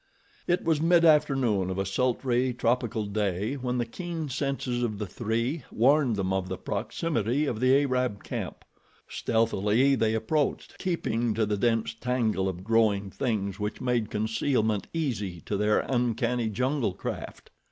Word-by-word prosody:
It 175 +1 +1
was 160 -2 +1
mid 170 +1 +5
afternoon 135 - +3
of 95 - -3
a 95 - 0
sultry, 125 +3 0
tropical 120 -3 0
day 100 +1 -1
when 125 -2 -2
the 120 - 0
keen 165 +4 -5
senses 135 -2 -2
of 110 -4 -1
the 105 - -3
three 115 - -2
warned 130 0 +3
them 95 -1 -1
of 95 -1 -1
the 95 - -3
proximity 120 - -1
of 120 -6 -2
the 130 +3 +4
Arab 125 -6 -1
camp. - - -5 0.4
Stealthily 115 +3 +2
they 110 -4 +2
approached, 135 +7 -1
keeping 120 -11 -1
to 110 - +2
the 105 0 0
dense 115 +1 +1
tangle 115 -5 0
of 90 0 -6
growing 105 -3 +2
things 100 -6 -2
which 105 0 -3
made 120 -4 0
concealment 110 -1 0
easy 105 - -2
to 105 - -3
their 105 +1 +2
uncanny 120 -1 0
jungle 125 0 0
craft. - - -6
115 Hz, 150 wpm, -27 LUFS, 105-130 Hz, 0.4 s, mid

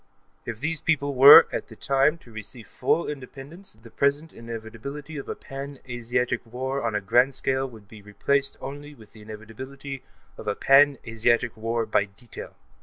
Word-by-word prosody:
If 115 -2 -5
these 160 +3 -1
peoples 145 -3 0
were, 135 +3 +11
at - - -3
this - - -14
time, 140 +4 +2
to 120 - -16
receive 110 +1 -8
full 170 - 0
independence, 145 +6 -8
the 115 0 -15
present 145 +5 0
inevitability 115 +6 -8
of 140 - -7
a - - -3
pan 140 +1 -8
Asiatic 125 0 -1
war 130 +4 -4
on 115 -2 -2
a 105 - 0
grand 120 +6 +3
scale 135 0 -1
would 110 -4 -15
be 105 0 -13
replaced 135 +8 -1
only 145 +2 -8
by 110 - -15
the 110 - -14
inevitability 130 +6 -9 0.4
of 110 - -9
a 105 - 0
pan 140 0 +5
Asiatic 115 +1 +1
war 115 +1 -2
by 105 -1 +1
detail. 100 +4 -11
125 Hz, 175 wpm, -25 LUFS, 115-140 Hz, 0.4 s, were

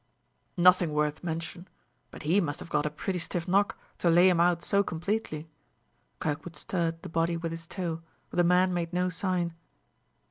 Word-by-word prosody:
"Nothing 180 -2 +5
worth 150 +1 0
mention; 170 +2 -4 0.4
but - - -10
he 175 +7 +3
must 145 -4 -3
have 170 - -10
got 150 0 +2
a - - 0
pretty 180 +5 -3
stiff 170 0 -3
knock, 200 +3 +2 0.2
to 175 - +3
lay 175 +3 +7
him 175 -2 +2
out 170 0 +3
so 200 - +3
completely." 175 -3 -3 0.7
Kirkwood 155 +2 -3
stirred 165 +1 -2
the - - -5
body 165 +1 0
with 165 0 -3
his 165 0 -7
toe, 170 -4 -3 0.3
but - - -6
the 175 - +5
man 180 +1 +4
made 170 -1 -2
no 180 +1 +1
sign. 180 -1 -1
170 Hz, 180 wpm, -29 LUFS, 165-180 Hz, 0.7 s, lay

